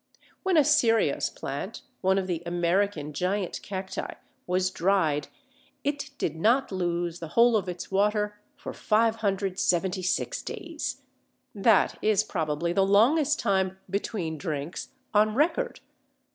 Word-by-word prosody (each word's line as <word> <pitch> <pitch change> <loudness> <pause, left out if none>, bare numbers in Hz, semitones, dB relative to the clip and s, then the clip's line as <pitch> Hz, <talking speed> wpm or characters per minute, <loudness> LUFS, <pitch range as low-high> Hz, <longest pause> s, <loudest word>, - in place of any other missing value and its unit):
When 370 -3 +2
a 305 - +7
Cereus 255 -7 +3
plant - - -6 0.2
(one 190 +1 +3
of 195 - 0
the 175 -3 -2
American 175 -2 0
Giant 185 +4 -2
Cacti) 190 -1 -5 0.3
was 185 +1 +1
dried, 165 -6 +1 0.6
it 285 0 -2
did 160 - -2
not 235 +11 +2
lose 175 -2 -2
the 165 - -6
whole 235 0 +6
of 200 -3 0
its 180 +2 -6
water 210 +1 +1
for 285 - -7
576 195 - 0
days. 340 -9 -5 0.5
That 205 0 +3
is 215 -1 +3
probably 170 -3 -2
the 195 - +3
longest 270 +10 +4
time 190 -3 +1
"between 180 -5 -3
drinks" 155 -1 -4 0.2
on 215 +1 +3
record. 345 - 0
195 Hz, 125 wpm, -27 LUFS, 175-225 Hz, 0.6 s, a